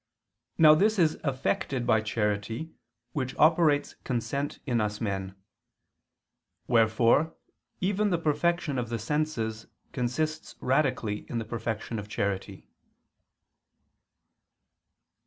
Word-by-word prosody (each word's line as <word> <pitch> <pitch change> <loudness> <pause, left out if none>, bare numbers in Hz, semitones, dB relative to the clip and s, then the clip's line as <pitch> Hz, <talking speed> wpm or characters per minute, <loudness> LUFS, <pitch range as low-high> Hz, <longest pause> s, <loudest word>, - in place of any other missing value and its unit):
Now 155 -1 +8
this 210 +7 +3
is 160 -4 +2
effected 130 -2 -1
by 110 -2 +3
charity 110 +6 -2 0.4
which 130 -1 -3
operates 155 -2 +4
consent 130 +3 -2
in 120 -5 +1
us 105 0 -2
men. 95 -3 -3 1.3
Wherefore 115 +6 +3 0.5
even 205 +2 +1
the 175 - +2
perfection 160 -2 0
of 120 -2 -3
the 115 - -2
senses 115 -4 -2 0.2
consists 155 +6 -2
radically 130 -6 0
in 120 - -3
the 115 - -2
perfection 115 -1 -4
of 105 - -7
charity. 100 -3 -3
125 Hz, 100 wpm, -28 LUFS, 110-155 Hz, 1.3 s, Now